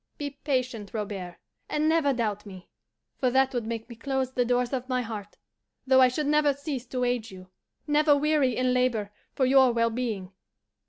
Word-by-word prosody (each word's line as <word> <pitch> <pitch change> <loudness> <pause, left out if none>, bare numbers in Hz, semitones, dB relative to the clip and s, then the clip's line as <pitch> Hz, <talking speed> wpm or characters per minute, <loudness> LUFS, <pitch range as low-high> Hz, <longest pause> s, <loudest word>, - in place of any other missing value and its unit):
Be 290 -1 -4
patient, 250 -7 -2
Robert, 195 -5 -5 0.3
and 300 +1 0
never 320 -3 +3
doubt 215 -5 -2
me; 190 -3 -12 0.5
for 255 - +2
that 265 +1 +2
would 240 -3 -2
make 230 -1 -4
me 235 - -10
close 265 +2 -2
the 250 -1 +1
doors 245 +1 0
of 255 0 -3
my 255 -1 0
heart, 210 -3 -7 0.5
though 260 0 +5
I 255 - +8
should 270 +4 -2
never 295 0 +3
cease 275 -3 -5
to 250 0 -2
aid 245 -2 -1
you, 185 -1 -13 0.3
never 295 0 +4
weary 290 -4 +2
in 255 0 +2
labor 240 -5 0 0.2
for 265 - +2
your 265 -1 +5
well 230 -1 +1
being. 220 -6 -3
250 Hz, 190 wpm, -27 LUFS, 225-270 Hz, 0.5 s, I